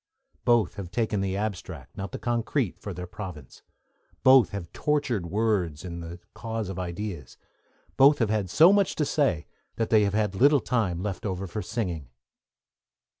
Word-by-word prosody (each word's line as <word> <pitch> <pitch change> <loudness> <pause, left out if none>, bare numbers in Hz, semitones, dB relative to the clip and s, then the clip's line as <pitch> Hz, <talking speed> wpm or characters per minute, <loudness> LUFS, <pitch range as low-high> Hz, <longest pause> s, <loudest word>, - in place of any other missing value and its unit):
Both 120 -5 +3
have 95 -3 -6
taken 110 -1 -1
the 95 0 -1
abstract, 105 -3 -5
not 100 -1 -5
the - - -5
concrete, 120 - -1
for 100 - -6
their 90 0 -6
province; 90 -8 -9 0.6
both 130 -2 +7
have 100 -5 -7
tortured 130 - 0
words 95 -5 0
in 85 -1 -6
the 85 +1 -8
cause 115 -3 -4
of 95 -1 -5
ideas, 90 -4 -5 0.6
both 140 +2 +7
have 115 -5 +1
had 105 -4 0
so 165 - +7
much 200 -2 +2
to 150 - 0
say 140 - +1 0.3
that 115 - -2
they 110 -1 +6
have 100 0 -1
had 105 -2 +1
little 140 +8 +5
time 100 -9 -1
left 100 -3 -4
over 95 -2 -3
for 100 +4 -4
singing. 90 - -4
105 Hz, 170 wpm, -27 LUFS, 90-115 Hz, 0.6 s, both